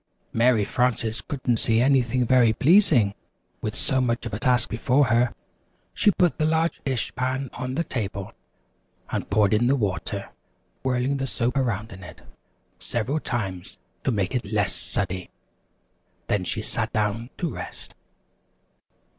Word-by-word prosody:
Mary 115 Hz, -2 st, +3 dB
Frances 115 Hz, -2 st, 0 dB
couldn't 130 Hz, -4 st, -1 dB
see 110 Hz, 0 st, +2 dB
anything 125 Hz, -1 st, +3 dB
very 120 Hz, -2 st, +5 dB
pleasing 140 Hz, -, +4 dB, 0.5 s
with -, -, -3 dB
so 130 Hz, -1 st, +1 dB
much 120 Hz, -1 st, 0 dB
of 115 Hz, -, -5 dB
a 105 Hz, -, -2 dB
task 125 Hz, -2 st, +3 dB
before 130 Hz, +5 st, +2 dB
her. 120 Hz, -1 st, +3 dB, 0.6 s
She -, -, +3 dB
put 180 Hz, -4 st, +2 dB
the 155 Hz, -, +2 dB
large 160 Hz, +1 st, +1 dB
dish 130 Hz, -4 st, -1 dB
pan 130 Hz, +1 st, -2 dB
on 130 Hz, 0 st, -4 dB
the 170 Hz, -, +1 dB
table 100 Hz, -, -4 dB, 0.8 s
and -, -, -3 dB
poured 105 Hz, 0 st, +3 dB
in 115 Hz, +3 st, +3 dB
the 135 Hz, -, +4 dB
water, 100 Hz, -3 st, -2 dB, 0.5 s
whirling 130 Hz, +1 st, 0 dB
the 135 Hz, 0 st, -2 dB
soap 120 Hz, +2 st, -1 dB
around 115 Hz, -5 st, -1 dB
in 95 Hz, 0 st, -11 dB
it 85 Hz, -, -12 dB, 0.6 s
several 125 Hz, +7 st, -2 dB
times 95 Hz, -10 st, -4 dB, 0.3 s
to -, -, +1 dB
make 105 Hz, -2 st, 0 dB
it 125 Hz, -, 0 dB
a -, -, -10 dB
little 105 Hz, 0 st, +1 dB
sudsy. 90 Hz, +1 st, -3 dB, 1.0 s
Then 100 Hz, -3 st, 0 dB
she -, -, -1 dB
sat -, -, -2 dB
down 110 Hz, +3 st, -1 dB
to 170 Hz, -4 st, -2 dB
rest. -, -, -8 dB
120 Hz, 155 wpm, -25 LUFS, 105-130 Hz, 1.0 s, very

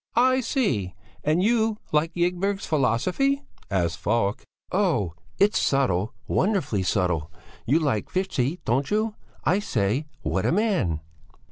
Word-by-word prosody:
"I 255 Hz, +2 st, +4 dB
see! 130 Hz, -, 0 dB, 0.3 s
And 155 Hz, +4 st, +2 dB
you 220 Hz, -1 st, +2 dB
like 155 Hz, +2 st, +2 dB
Ygberg's 180 Hz, +3 st, 0 dB
philosophy?" 175 Hz, -, +1 dB, 0.3 s
asked 85 Hz, -5 st, 0 dB
Falk. 110 Hz, -1 st, 0 dB, 0.3 s
"Oh! 170 Hz, -, +1 dB, 0.2 s
It's 205 Hz, +1 st, +4 dB
subtle, 120 Hz, -7 st, +1 dB
wonderfully 185 Hz, -, +1 dB
subtle! 90 Hz, -5 st, 0 dB, 0.4 s
You 140 Hz, +6 st, +4 dB
like 140 Hz, -10 st, 0 dB
Fichte, 180 Hz, -5 st, -1 dB
don't 130 Hz, +5 st, +1 dB
you? 215 Hz, +1 st, +1 dB, 0.3 s
I 180 Hz, +6 st, +3 dB
say! 125 Hz, -, 0 dB, 0.2 s
What -, -, 0 dB
a -, -, +2 dB
man!" 175 Hz, -, +1 dB
155 Hz, 125 wpm, -25 LUFS, -, 0.4 s, I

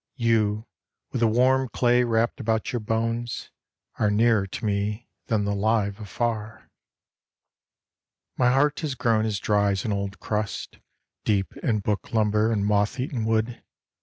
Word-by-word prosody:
You, 110 Hz, -3 st, +1 dB, 0.5 s
with 125 Hz, -, -2 dB
the 115 Hz, -, +5 dB
warm 130 Hz, +3 st, +3 dB
clay 125 Hz, +1 st, +3 dB
wrapt 115 Hz, +1 st, +1 dB
about 110 Hz, -2 st, -1 dB
your 120 Hz, -, 0 dB
bones, 115 Hz, +2 st, -2 dB, 0.5 s
Are 105 Hz, -, +3 dB
nearer 110 Hz, -1 st, +3 dB
to 95 Hz, -, -6 dB
me 105 Hz, +2 st, -1 dB, 0.2 s
than 110 Hz, -3 st, +1 dB
the 100 Hz, -, 0 dB
live 100 Hz, 0 st, +1 dB
afar. 110 Hz, 0 st, -4 dB, 1.6 s
My 125 Hz, -1 st, +3 dB
heart 145 Hz, +3 st, +2 dB
has 150 Hz, -5 st, -3 dB
grown 110 Hz, -3 st, +2 dB
as 105 Hz, -2 st, -1 dB
dry 100 Hz, +1 st, +2 dB
as 95 Hz, -, -3 dB
an 105 Hz, -, 0 dB
old 100 Hz, 0 st, -3 dB
crust, 105 Hz, -1 st, -3 dB, 0.4 s
Deep 100 Hz, -3 st, 0 dB
in 110 Hz, -3 st, 0 dB
book 105 Hz, +4 st, -2 dB
lumber 110 Hz, 0 st, +2 dB
and 105 Hz, -3 st, 0 dB
moth 105 Hz, +3 st, +1 dB
eaten 125 Hz, -3 st, -2 dB
wood. 110 Hz, +1 st, 0 dB
110 Hz, 150 wpm, -25 LUFS, 105-120 Hz, 1.6 s, the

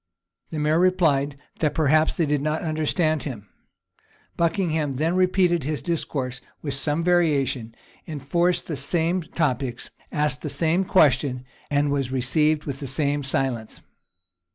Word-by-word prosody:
The 160 Hz, -, -5 dB
mayor 155 Hz, +2 st, +2 dB
replied, 155 Hz, -6 st, +2 dB, 0.2 s
that 155 Hz, -2 st, 0 dB
perhaps 155 Hz, 0 st, +3 dB
they 165 Hz, -, +2 dB
did 145 Hz, -1 st, 0 dB
not 155 Hz, +2 st, -1 dB
understand 155 Hz, 0 st, 0 dB
him. 115 Hz, -8 st, -6 dB, 0.9 s
Buckingham 160 Hz, -4 st, 0 dB
then 160 Hz, +6 st, 0 dB
repeated 180 Hz, -3 st, +2 dB
his 150 Hz, +2 st, -3 dB
discourse 135 Hz, -6 st, -3 dB, 0.2 s
with 140 Hz, -3 st, -2 dB
some 145 Hz, +4 st, 0 dB
variation. 140 Hz, -9 st, +1 dB, 0.3 s
enforced 170 Hz, +4 st, 0 dB
the 155 Hz, -, -4 dB
same 165 Hz, +6 st, +1 dB
topics, 135 Hz, -7 st, -2 dB, 0.2 s
asked 150 Hz, -2 st, 0 dB
the 150 Hz, -, -4 dB
same 170 Hz, +6 st, +1 dB
question, 135 Hz, -8 st, +3 dB, 0.2 s
and 145 Hz, 0 st, +1 dB
was 135 Hz, -3 st, -1 dB
received 150 Hz, +4 st, +2 dB
with 140 Hz, -2 st, -5 dB
the 140 Hz, -, -5 dB
same 145 Hz, +2 st, 0 dB
silence. 130 Hz, -4 st, -2 dB
150 Hz, 135 wpm, -24 LUFS, 135-165 Hz, 0.9 s, perhaps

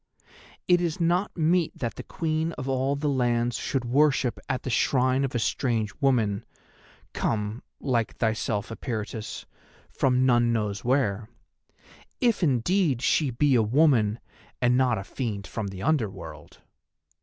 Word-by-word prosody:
It 175 Hz, -1 st, +4 dB
is 170 Hz, -1 st, -2 dB
not 175 Hz, +4 st, 0 dB
meet 165 Hz, +1 st, +1 dB
that 120 Hz, -3 st, -3 dB
the -, -, -7 dB
Queen 160 Hz, 0 st, -2 dB
of 130 Hz, -, -6 dB
all 135 Hz, +1 st, 0 dB
the 145 Hz, +1 st, -2 dB
Lands 120 Hz, -3 st, +1 dB
should 130 Hz, -3 st, -2 dB
worship 135 Hz, -1 st, +2 dB
at 130 Hz, -2 st, -2 dB
the 130 Hz, -, -3 dB
shrine 130 Hz, +3 st, +2 dB
of 135 Hz, -2 st, -2 dB
a -, -, +3 dB
strange 115 Hz, -2 st, -1 dB
woman, 115 Hz, -7 st, +2 dB, 0.7 s
come—like 115 Hz, +2 st, -2 dB
thyself, 110 Hz, -2 st, -1 dB
Eperitus—from 115 Hz, +3 st, -3 dB
none 120 Hz, -2 st, +3 dB
knows 105 Hz, -3 st, -2 dB
where: 115 Hz, -5 st, 0 dB, 0.9 s
if 235 Hz, -5 st, +2 dB
indeed 145 Hz, -, +1 dB
she 150 Hz, 0 st, +2 dB
be 135 Hz, +3 st, +2 dB
a 120 Hz, -, +5 dB
woman 115 Hz, -2 st, +3 dB, 0.4 s
and 125 Hz, 0 st, +3 dB
not 125 Hz, -3 st, +2 dB
a 95 Hz, -, -4 dB
fiend 105 Hz, -3 st, -4 dB
from 105 Hz, +3 st, -4 dB
the 95 Hz, 0 st, -7 dB
Under 145 Hz, -8 st, +2 dB
World. -, -, -11 dB
125 Hz, 140 wpm, -26 LUFS, 115-145 Hz, 0.9 s, a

